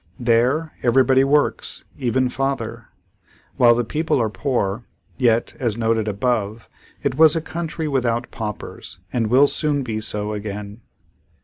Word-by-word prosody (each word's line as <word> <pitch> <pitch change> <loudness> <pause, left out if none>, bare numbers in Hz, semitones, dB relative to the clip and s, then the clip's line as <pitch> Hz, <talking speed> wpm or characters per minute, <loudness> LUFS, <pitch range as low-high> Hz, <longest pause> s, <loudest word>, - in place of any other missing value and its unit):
There, 125 +7 +2
everybody 130 +2 +4
works, 145 +2 0
even 130 0 +1
father. 135 +2 -3 0.7
While 120 -1 +6
the 120 - +1
people 150 +5 0
are 110 -3 0
poor, 115 -4 -1 0.4
yet, 120 -2 +2
as 115 -4 0
noted 115 -1 +1
above, 110 0 -1 0.4
it 135 -2 -1
was 160 -1 +7
a - - +2
country 160 0 -4
without 120 -4 -1
paupers 105 -5 -7 0.2
and 115 -3 +1
will 130 +5 +5
soon 145 -1 0
be 110 -3 -3
so 105 0 -1
again. 105 +1 -6
120 Hz, 135 wpm, -21 LUFS, 110-135 Hz, 0.7 s, was